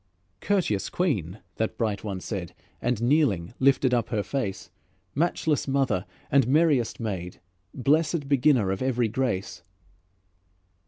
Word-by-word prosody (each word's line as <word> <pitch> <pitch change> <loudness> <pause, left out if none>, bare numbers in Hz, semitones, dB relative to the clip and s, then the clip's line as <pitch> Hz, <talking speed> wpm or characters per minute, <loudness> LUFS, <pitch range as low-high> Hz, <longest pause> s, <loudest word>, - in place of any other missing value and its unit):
"Courteous 180 - 0
Queen," 110 - -1 0.2
that 110 - -2
bright 110 -3 -1
one 100 -3 -4
said, 90 -3 -5 0.3
And, 120 -2 -1
kneeling, 120 - +2
lifted 135 -1 +3
up 115 -2 +1
her 105 -2 -1
face: 100 -3 -4 0.4
"Matchless 160 -1 0
Mother 135 -8 0 0.2
and 135 -3 +4
merriest 140 -5 +2
Maid, 95 -6 -4 0.4
Blessèd 150 +3 +1
Beginner 135 -7 +3
of 95 - -3
every 125 -3 +1
grace." 100 -7 -2
120 Hz, 120 wpm, -26 LUFS, 100-140 Hz, 0.4 s, and